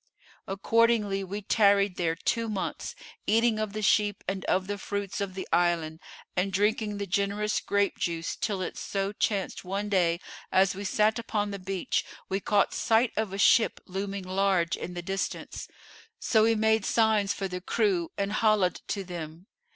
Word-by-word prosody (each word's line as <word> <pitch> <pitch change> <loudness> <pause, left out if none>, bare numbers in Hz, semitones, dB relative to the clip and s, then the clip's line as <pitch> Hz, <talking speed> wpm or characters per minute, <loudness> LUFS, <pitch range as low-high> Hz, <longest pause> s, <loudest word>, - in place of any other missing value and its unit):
Accordingly 205 0 +2
we 200 +2 -5
tarried 200 -2 +3
there 165 -2 0
two 230 +6 -1
months, 200 -3 -4 0.3
eating 225 0 +3
of 215 -2 -2
the 215 0 -4
sheep 205 -1 +2
and 195 0 -2
of 185 0 +1
the 205 +1 -4
fruits 200 0 -3
of 190 -2 -3
the 190 - -5
island 165 -2 +1 0.4
and 190 +2 0
drinking 210 +1 +1
the 200 - -3
generous 200 +2 0
grape 200 0 0
juice 165 -1 -2
till 200 -4 -2
it - - -5
so 195 0 -2
chanced 205 -2 -1
one 200 +3 -3
day, 175 -4 +2 0.3
as 190 0 +4
we 200 +2 -6
sat 215 +3 +2
upon 210 -3 -2
the 200 - -5
beach, 190 0 -1 0.3
we 195 - 0
caught 200 0 +2
sight 225 +1 +2
of 215 -3 -1
a 195 - -4
ship 220 +2 +4
looming 195 +1 -4
large 185 -2 +1
in 180 - -7
the 175 - -5
distance; 195 +2 -4 0.5
so 220 - +3
we 225 +1 +4
made 220 0 +2
signs 215 -2 +2
for 195 - -2
the 180 -1 -5
crew 190 -4 +1
and 200 0 -1
holla'd 215 -4 +2
to 200 - -2
them. 170 -1 -7
200 Hz, 175 wpm, -28 LUFS, 185-210 Hz, 0.5 s, as